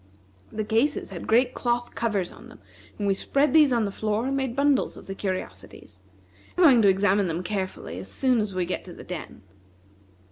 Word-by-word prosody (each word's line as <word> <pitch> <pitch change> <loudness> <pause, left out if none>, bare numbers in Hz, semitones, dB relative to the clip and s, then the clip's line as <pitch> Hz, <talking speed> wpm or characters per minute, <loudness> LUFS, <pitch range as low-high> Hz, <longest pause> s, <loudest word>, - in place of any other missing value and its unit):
The 215 - -3
cases 225 +4 0
had 175 - -7
great 245 +3 +3
cloth 240 0 -1
covers 205 -6 -1
on - - -14
them, - - -15 0.4
and 205 - -3
we 200 - +3
spread 280 +9 +1
these 305 -4 +6
on 235 -3 +2
the 200 - -3
floor 215 +3 -1
and 270 +1 -1
made 265 -3 -2
bundles 280 -1 +1
of - - -12
the 195 - -6
curiosities. 190 -1 -6 0.6
We 365 - +4
are - - +8
going 255 -7 +7
to 205 - +5
examine 195 0 +2
them 170 +2 -3
carefully 185 - -4
as 95 0 -6
soon 255 - +2
as 210 -3 -2
we 180 -1 0
get 180 - -4
to 180 - -10
the - - -11
den." 165 - -8
215 Hz, 210 wpm, -25 LUFS, 190-250 Hz, 0.6 s, are